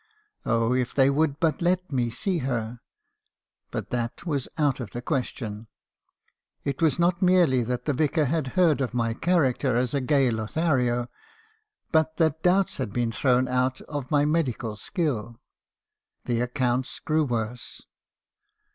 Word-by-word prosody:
Oh! 115 +1 +2
if 125 -1 -1
they 135 0 +5
would 145 0 +1
but 165 -1 +1
let 180 +1 +1
me 125 -3 0
see 180 - -1
her! 120 -3 -3 0.9
But - - -5
that 120 +7 -3
was 145 -6 -1
out 145 -4 +1
of 120 -5 -5
the 120 - -4
question. 115 -6 -3 1.0
It 140 +4 -3
was 160 -3 +3
not 175 +1 +2
merely 180 -9 +4
that 120 +1 -3
the 150 - +1
Vicar 155 +2 +1
had 150 0 -1
heard 165 -6 +4
of 125 -1 -2
my 115 -1 0
character 135 -5 +1
as 125 0 0
a 140 - +1
gay 135 -1 +3
Lo 110 -1 -2
thario, 125 -4 0 0.8
but 160 0 +2
that 160 -1 +1
doubts 185 +2 +2
had 125 -6 -3
been 120 0 0
thrown 130 +2 +2
out 125 +1 0
of 145 -3 -6
my 145 -1 +3
medical 135 -8 -1
skill. 120 - -3 0.9
The 120 -1 0
accounts 125 0 -1
grew 155 0 +1
worse. 120 -2 -4
130 Hz, 155 wpm, -26 LUFS, 120-160 Hz, 1.0 s, they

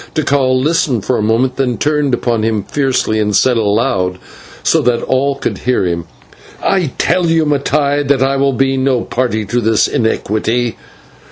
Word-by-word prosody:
Tikal 135 -4 +1
listened 150 - 0
for 125 - +1
a - - -1
moment, 115 +4 0
then 125 -3 0
turned 150 -3 +1
upon 120 -2 -1
him 110 -2 -1
fiercely 130 -4 0
and 105 -1 0
said 125 +4 +3
aloud, 105 -4 0 0.5
so - - +2
that 120 -1 0
all 135 +2 0
could 140 - -4
hear 125 -6 0
him: 85 -2 -2 0.6
"I 180 -8 0
tell 180 -2 +1
you, 165 -1 +2
Mattai, 145 0 +1
that 135 -2 +2
I 135 +1 +1
will 135 0 +1
be 135 +1 +1
no 130 -2 +1
party 120 -4 -2
to 120 +4 -1
this 110 -1 +2
iniquity. 110 +1 -1
130 Hz, 170 wpm, -15 LUFS, 110-140 Hz, 0.6 s, said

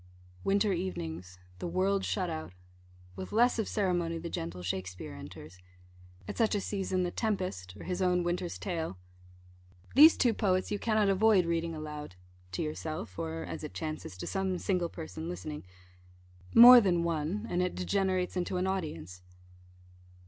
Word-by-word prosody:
Winter 200 +1 +2
evenings 90 - -5 0.2
the - - -3
world 190 +3 +1
shut 185 -3 -1
out 160 - -5 0.6
with 95 0 -7
less 240 +2 +3
of 220 - 0
ceremony 175 -5 0
the 170 +1 -6
gentle 85 +2 -5
Shakspeare 90 0 -4
enters. 85 +5 -11 0.7
At - - -6
such 225 -2 +3
a - - +1
season, 190 -2 -1
the 175 - -1
Tempest, 180 - -3
or - - -9
his 180 0 -3
own 180 -1 +2
Winter's 175 0 -2
Tale 165 - -4 1.0
These 305 +5 +8
two 240 -3 +3
poets 185 -3 0
you 205 - -1
cannot 215 -3 +2
avoid 195 -1 +4
reading 165 0 -1
aloud 150 -8 -7 0.4
to - - -1
yourself, 155 - -5
or 80 0 -3
(as - - -6
it 90 - -7
chances) 155 -6 -5
to - - -6
some 190 -1 -1
single 180 -2 0
person 160 0 -7
listening. 155 -4 -6 0.9
More 245 +1 +11
than 175 -4 +2
one 170 +6 -2
and 175 -3 0
it 180 0 -1
degenerates 185 -1 0
into 180 0 -1
an 180 - 0
audience. 150 - -4
175 Hz, 155 wpm, -31 LUFS, 155-195 Hz, 1.0 s, More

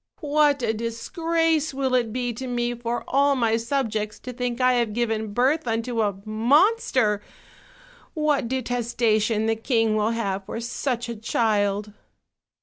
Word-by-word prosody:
What 290 -2 +2
a 220 -1 +1
disgrace 315 +7 -1
will 265 -1 -1
it 240 -3 +2
be 245 0 -2
to 260 +3 -6
me 240 -1 -1
for 240 0 -3
all 280 +1 +3
my 230 -3 +2
subjects 225 -3 -2
to 250 - -7
think 245 0 -3
I 255 0 +4
have 235 -3 0
given 220 -2 -1
birth 260 +6 +1
unto 230 +1 -1
a 205 -3 0
monster! 240 - +2 0.9
What 300 -5 +1
detestation 235 -3 0
the 225 0 +1
king 225 -1 +1
will 215 0 +1
have 200 -4 -2
for - - -4
such 240 +1 -2
a 235 - -4
child!" 210 -2 0
235 Hz, 145 wpm, -24 LUFS, 220-260 Hz, 0.9 s, I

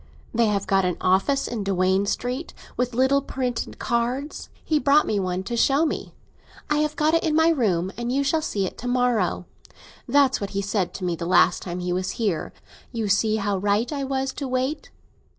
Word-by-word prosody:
They 230 -1 +3
have 200 -2 0
got 195 -1 +2
an 180 -1 -1
office 195 +10 +2
in 230 -4 -3
Duane 190 0 +1
Street, 250 +9 -3 0.2
and 250 0 -1
little 265 +3 +3
printed 255 -3 -3
cards; 245 +4 -2 0.2
he 310 -2 +2
brought 290 +1 +4
me 205 - 0
one 185 -1 -2
to 235 +4 -4
show 275 +6 +3
me. 310 - -4 0.6
I 300 - +3
have 305 0 0
got 310 +1 +2
it 330 - +3
in 315 -2 +1
my 320 +1 +5
room, 190 - +1
and 240 0 -3
you 275 +2 +1
shall 315 +3 +1
see 200 -10 -1
it - - -7
to 245 - -5
morrow. 245 -8 +1 0.6
That's 275 -1 +3
what 200 - -3
he - - +1
said 195 -2 -1
to 190 - -6
me 175 -1 0
the 170 0 -5
last 185 - +4
time 180 0 -5
he 180 0 -1
was 185 +1 -2
here—'You 215 +2 -4
see 215 +2 +2
how 200 -2 -1
right 205 +7 0
I 280 -1 -2
was 270 0 -2
to 280 - -4
wait! 260 +4 -2
235 Hz, 205 wpm, -24 LUFS, 195-275 Hz, 0.6 s, my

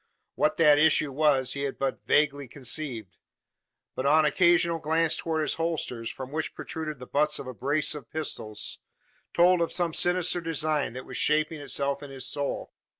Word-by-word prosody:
What 155 - +1
that 150 -3 +6
issue 150 -2 +3
was 135 -2 +2
he 140 - -4
had 140 -1 -3
but 135 -1 -3
vaguely 145 -2 +2
conceived; 125 - -3 0.8
but 130 - -4
on 155 +2 +5
occasional 170 +2 +3
glance 160 +1 +2
towards 160 -2 -1
his - - +1
holsters 155 -8 -2
from 130 0 -8
which 155 +1 -3
protruded 155 -2 -5
the 125 - -10
butts 150 +3 +1
of - - -7
a 130 - -6
brace 145 +6 +1
of 140 -6 -9
pistols 110 -9 -4 0.5
told 175 0 +4
of 170 - 0
some 175 -3 0
sinister 175 0 +2
design 155 -5 -1
that 130 +1 -8
was 130 - -7
shaping 155 0 +1
itself 140 -1 -2
in 145 - -9
his 135 -2 -4
soul. 145 -1 -2
150 Hz, 175 wpm, -27 LUFS, 135-160 Hz, 0.8 s, that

